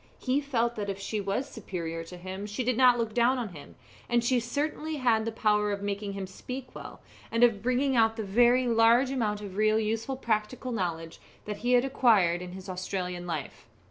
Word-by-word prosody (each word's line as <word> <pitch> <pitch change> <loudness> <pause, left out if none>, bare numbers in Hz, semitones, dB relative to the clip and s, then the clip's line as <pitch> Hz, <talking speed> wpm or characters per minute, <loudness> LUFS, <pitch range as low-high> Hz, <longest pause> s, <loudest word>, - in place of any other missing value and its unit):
He 265 +2 0
felt 240 -4 0
that 205 -1 -3
if 195 - -3
she 205 +2 -3
was 200 +8 -2
superior 170 -8 -5
to 180 +2 -10
him 190 +3 -6
she 210 +5 -3
did 250 0 +1
not 250 0 +6
look 225 -2 -2
down 245 +3 +3
on 235 -4 -3
him; 150 -5 -12 0.3
and 240 -1 +2
she 245 +1 +2
certainly 300 +6 -3
had 235 -5 +2
the 230 - -2
power 210 -2 +1
of 200 0 -3
making 200 0 -3
him 195 -1 -4
speak 255 +7 -8
well, - - -10 0.3
and 230 +1 +2
of 230 -4 +4
bringing 255 +3 +1
out 225 -1 +4
the 220 - -3
very 240 +5 +4
large 235 +2 +4
amount 215 -6 -1
of 200 -2 -8
real 215 +1 +3
useful 225 +4 -2
practical 235 +2 -2
knowledge 170 -6 -3 0.3
that 210 -1 -4
he 245 +2 0
had 245 +1 +4
acquired 210 -10 +3
in 180 0 -7
his 190 0 -9
Australian 180 -1 -4
life. 160 -4 -5
220 Hz, 205 wpm, -28 LUFS, 195-245 Hz, 0.3 s, not